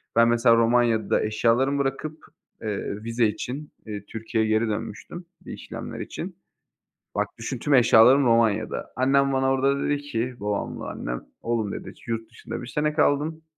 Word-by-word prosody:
Ben 115 0 +6
mesela 115 0 +5
Romanya'da 115 -1 +3
eşyalarımı 115 +6 +2
bırakıp, 140 +3 -2 0.4
eee, 105 -1 -4
vize 115 0 +1
için, 130 +7 -5 0.2
iii, 105 -1 -6
Türkiye'ye 110 0 -2
geri 110 +1 +2
dönmüştüm, 110 - -5 0.2
bir - - -7
işlemler - - -7
için. - - -6 0.8
Bak, - - +1
düşün 120 +2 -4
tüm 145 +3 0
eşyalarım 125 +2 +6
Romanya'da. 115 -2 +1
Annem 135 +2 +3
bana 135 0 +2
orada 135 +1 +1
dedi 145 - +1
ki, 125 -3 -3
babamla 105 0 -3
annem, - - -4 0.2
oğlum 115 -3 -1
dedi, - - -7
yurt 115 -1 -3
dışında 115 - -7
1 125 - -8
sene 150 +5 0
kaldın 155 +1 +1
120 Hz, 150 wpm, -25 LUFS, 110-135 Hz, 0.8 s, Ben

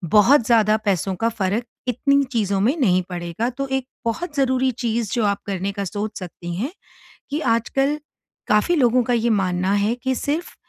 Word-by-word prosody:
बहुत 230 +4 +6
ज़्यादा 215 -2 +4
पैसों 190 -1 0
का 225 +5 0
फ़र्क, 215 +1 -1 0.2
इतनी 280 +3 +2
चीज़ों 200 -4 +1
में 250 +8 +2
नहीं 185 - +3
पड़ेगा, 175 +6 -3
तो 275 +2 -4
एक 265 -1 -2 0.2
बहुत 295 +7 -3
ज़रूरी 260 -1 +2
चीज़ 225 -2 -1
जो 235 -3 +1
आप 200 -1 0
करने 195 0 -2
का 200 0 -4
सोच 205 +3 -4
सकती 175 -1 -7
हैं 250 - -2 0.6
कि, 295 - -1
आजकल 270 +4 +1 0.5
काफ़ी 210 +12 +3
लोगों 250 -3 +4
का 245 - 0
ये 235 0 +1
मानना 185 -2 +1
है 205 +3 +2
कि 260 +1 -1
सिर्फ़ 295 +6 -3
225 Hz, 180 wpm, -22 LUFS, 200-260 Hz, 0.6 s, बहुत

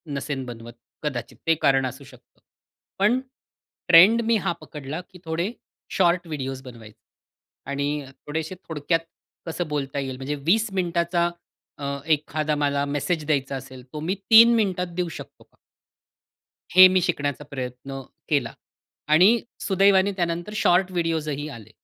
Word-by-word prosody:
नसेन 140 -1 -3
बनवत, 120 -1 -9 0.3
कदाचित 120 -5 -4
ते 165 - +5
कारण 135 -1 +3
असू 130 +2 -6
शकतं. 130 -2 -19 0.6
पण 215 +6 +3 0.7
ट्रेंड 185 +7 +8
मी 230 0 +3
हा 190 - +1
पकडला, 150 +3 -7
की 180 - -15
थोडे 165 +5 -2 0.4
शॉर्ट 175 -1 +2
व्हिडिओज 135 -4 -4
बनवायचे. 115 -4 -13 0.7
आणि 140 0 -2 0.2
थोडेसे 160 +4 -3
थोडक्यात 160 +1 0 0.5
कसं 170 0 -3
बोलता 140 -2 -3
येईल, 135 -1 -4
म्हणजे 140 +2 -3
20 220 +7 +3
मिनिटाचा 170 -1 0 0.5
अ, 140 - -6 0.3
एखादा 150 0 -1
मला 145 -1 0
मेसेज 150 +3 -2
द्यायचा 140 -3 0
असेल, 130 -1 -9
तो 150 - -4
मी 175 +5 -1 0.2
3 230 +1 +9
मिनिटात 185 -5 0
देऊ 180 -1 -1
शकतो - - -11
का - - -35 1.2
हे 185 0 +11
मी 185 0 +3
शिकण्याचा 145 -5 -1
प्रयत्न 130 0 -6 0.3
केला - - 0 0.6
आणि 190 +9 +6 0.2
सुदैवाने 195 0 +3
त्यानंतर 175 +2 -2
शॉर्ट 185 -2 +3
व्हिडिओजही 155 -4 -2
आले. 110 -6 -11
155 Hz, 135 wpm, -24 LUFS, 140-180 Hz, 1.2 s, हे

